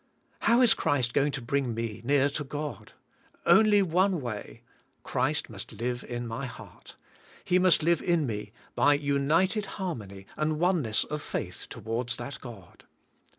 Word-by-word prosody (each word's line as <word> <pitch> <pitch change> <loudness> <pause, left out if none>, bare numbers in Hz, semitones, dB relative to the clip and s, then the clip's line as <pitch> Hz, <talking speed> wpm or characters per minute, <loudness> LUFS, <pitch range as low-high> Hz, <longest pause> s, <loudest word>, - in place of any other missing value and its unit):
How 235 +2 +4
is 240 -3 +7
Christ 125 -4 0
going 145 +1 +2
to 125 - -4
bring 125 -1 -1
me 115 -2 -4
near 140 +2 +3
to 150 +1 -3
God? 145 +2 -6 0.5
Only 210 -2 +6
one 185 +1 +2
way. 115 -2 -6 0.4
Christ - - 0
must - - -9
live 120 +1 -3
in 120 0 -5
my 115 +4 -4
heart. 115 - -12 0.5
He 180 - +3
must 180 -4 +4
live 170 0 +3
in 170 -4 +2
me 105 -4 -4 0.2
by 145 0 +4
united 150 +9 +1
har 190 -3 -2
mony 100 -5 -10
and 155 0 0
oneness 160 - +2
of 150 0 -5
faith - - -5
towards 120 +3 -3
that 140 -2 -7
God. 110 -8 -12
140 Hz, 155 wpm, -28 LUFS, 120-170 Hz, 0.5 s, is